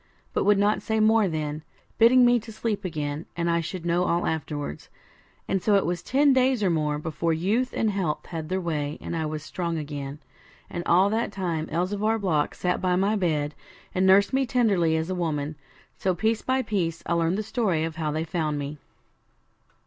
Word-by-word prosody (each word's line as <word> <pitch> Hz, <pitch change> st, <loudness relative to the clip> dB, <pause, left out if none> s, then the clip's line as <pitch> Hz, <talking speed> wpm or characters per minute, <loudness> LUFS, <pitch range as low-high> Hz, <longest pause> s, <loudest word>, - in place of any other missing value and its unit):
but -, -, +1 dB
would 205 Hz, -1 st, +5 dB
not 205 Hz, +1 st, +2 dB
say 220 Hz, 0 st, -1 dB
more 220 Hz, -1 st, +4 dB
then, 155 Hz, -2 st, -3 dB, 0.4 s
bidding 245 Hz, +2 st, +7 dB
me 240 Hz, 0 st, +5 dB
get -, -, -13 dB
to 225 Hz, -, -8 dB
sleep 215 Hz, -1 st, -3 dB
again, 150 Hz, -3 st, -4 dB
and 170 Hz, 0 st, +1 dB
I 170 Hz, -, +2 dB
should 170 Hz, +1 st, -5 dB
know 175 Hz, +1 st, +2 dB
all 170 Hz, 0 st, +1 dB
afterwards. 145 Hz, -, -4 dB, 0.6 s
And 195 Hz, -, 0 dB
so 205 Hz, +2 st, +3 dB
it 195 Hz, -, +3 dB
was 175 Hz, 0 st, -1 dB
ten 280 Hz, +1 st, +3 dB
days 255 Hz, -3 st, +2 dB
or 185 Hz, -, +3 dB
more 150 Hz, -2 st, 0 dB
before 160 Hz, +2 st, -1 dB
youth 210 Hz, +10 st, 0 dB
and 220 Hz, -1 st, 0 dB
health 185 Hz, -6 st, -2 dB
had 160 Hz, -2 st, -6 dB
their 185 Hz, +1 st, 0 dB
way, 150 Hz, -4 st, -2 dB
and -, -, -5 dB
I 160 Hz, -1 st, -1 dB
was 155 Hz, 0 st, -5 dB
strong 170 Hz, 0 st, -3 dB
again; 145 Hz, -2 st, -5 dB, 0.5 s
and 175 Hz, -, -4 dB
all 185 Hz, +4 st, +4 dB
that 225 Hz, +2 st, 0 dB
time 170 Hz, -5 st, -2 dB
Elzevir 205 Hz, +7 st, 0 dB
Block 165 Hz, -8 st, 0 dB
sat 180 Hz, 0 st, -1 dB
by 180 Hz, -1 st, +2 dB
my 200 Hz, +4 st, +2 dB
bed, 155 Hz, -6 st, 0 dB, 0.4 s
and 185 Hz, +1 st, +2 dB
nursed 200 Hz, +5 st, +5 dB
me 265 Hz, -1 st, +2 dB
tenderly 195 Hz, -11 st, +2 dB
as 160 Hz, +3 st, -2 dB
a -, -, 0 dB
woman. 155 Hz, -4 st, -2 dB, 0.4 s
So 185 Hz, -1 st, +1 dB
piece 220 Hz, +5 st, 0 dB
by 260 Hz, 0 st, 0 dB
piece 170 Hz, -7 st, -2 dB
I -, -, 0 dB
learned 170 Hz, +2 st, +1 dB
the 215 Hz, -, -2 dB
story 205 Hz, -7 st, 0 dB
of 160 Hz, -1 st, -4 dB
how 155 Hz, -2 st, -1 dB
they 155 Hz, +2 st, -1 dB
found 160 Hz, -2 st, -2 dB
me. 145 Hz, +1 st, -5 dB
175 Hz, 205 wpm, -26 LUFS, 160-210 Hz, 0.6 s, bidding